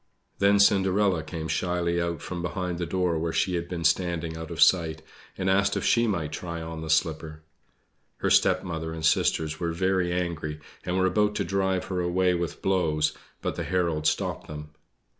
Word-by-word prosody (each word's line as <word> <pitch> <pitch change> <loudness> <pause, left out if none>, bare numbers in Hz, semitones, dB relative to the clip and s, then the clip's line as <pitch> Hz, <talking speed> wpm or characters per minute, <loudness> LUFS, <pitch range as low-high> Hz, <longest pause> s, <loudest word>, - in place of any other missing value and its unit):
Then 100 +1 +5
Cinderella 100 -2 +3
came 80 0 -6
shyly 85 0 0
out 85 -2 -3
from 90 -1 -5
behind 90 0 -3
the 85 - -2
door 90 -2 0
where 80 +1 -1
she 90 - 0
had 85 -1 -2
been 85 -2 -4
standing 85 -1 +1
out 80 0 -7
of 85 -2 -7
sight, 80 -4 +4 0.3
and 95 - -2
asked 100 +1 +2
if - - -2
she 115 0 +3
might 85 -8 -1
try 85 +2 -5
on 80 0 -6
the 80 - -6
slipper. 80 -1 0 0.7
Her - - -1
stepmother 80 -2 +2
and 80 -1 -4
sisters 80 0 +2
were 85 -1 -1
very 95 0 +1
angry, 85 -4 -3 0.2
and 90 +1 -1
were 95 - +3
about 105 +3 +2
to - - 0
drive 95 -1 0
her 95 -1 -3
away 90 +1 +2
with 85 -1 -3
blows, 75 -5 +1 0.3
but - - -1
the - - -2
herald 85 -4 0
stopped - - -1
them. 75 0 -8
85 Hz, 185 wpm, -26 LUFS, 80-95 Hz, 0.7 s, Then